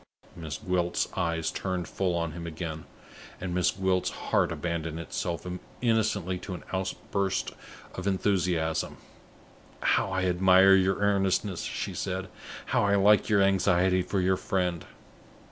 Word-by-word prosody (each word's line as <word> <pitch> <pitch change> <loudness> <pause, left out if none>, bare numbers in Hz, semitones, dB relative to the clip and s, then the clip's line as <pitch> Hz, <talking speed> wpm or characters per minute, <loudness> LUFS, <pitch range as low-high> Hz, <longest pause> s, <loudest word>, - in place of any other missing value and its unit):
Miss 80 -5 -5
Gwilt's 90 -2 0
eyes 85 -1 -1
turned 90 -2 -3
full 90 -3 -1
on 85 -1 -1
him 85 +1 -7
again, 80 -1 -5 0.5
and 90 -1 -4
Miss 90 0 +2
Gwilt's 95 -1 0
heart - - 0
abandoned 85 -2 -3
itself 85 +1 -4 0.3
innocently 105 -6 +1
to 90 0 -6
an - - -9
outburst 95 +1 -2 0.4
of 95 +1 -5
enthusiasm. 90 -5 0 0.8
"How - - +2
I 95 0 -1
admire 95 +1 +6
your 95 0 +4
earnestness!" 100 -2 +1
she - - -4
said. 95 0 -3 0.4
"How - - +1
I 100 0 +3
like 105 +2 +4
your 100 -2 +4
anxiety 95 -1 +3
for 95 +2 -2
your 95 +1 +2
friend! 90 -4 -1
95 Hz, 135 wpm, -28 LUFS, 85-95 Hz, 0.8 s, admire